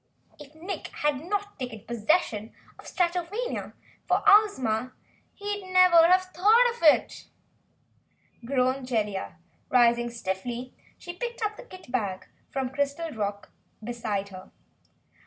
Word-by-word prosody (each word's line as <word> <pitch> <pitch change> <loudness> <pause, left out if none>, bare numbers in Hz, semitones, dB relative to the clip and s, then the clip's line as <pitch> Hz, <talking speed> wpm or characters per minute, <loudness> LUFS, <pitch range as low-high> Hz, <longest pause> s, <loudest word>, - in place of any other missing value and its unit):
"If 295 +1 -13
Nick 355 +5 -6
had 295 -1 -2
not 410 0 -3
'taken 245 -5 -6
possession' 230 - 0 0.3
of - - -13
Stratovania 360 +7 -2 0.3
for - - +2
Ozma, 255 - +4 0.4
he'd 410 -2 -5
never 360 -3 +7
have 370 +1 +4
thought 435 +7 +4
of - - -16
it," 310 -3 +3 1.2
groaned 255 +1 0
Jellia. 210 -7 -2 0.3
Rising 240 -1 +4
stiffly, 235 +3 -5 0.2
she 350 - -8
picked 475 +4 -5
up 425 0 -1
the - - -10
kit 370 - -13
bag 200 -7 -2 0.2
from 265 -2 -2
the - - -19
crystal 285 +4 -2
rock 205 -3 -4 0.3
beside 215 -4 -3
her. 185 -1 -11
275 Hz, 125 wpm, -27 LUFS, 235-370 Hz, 1.2 s, never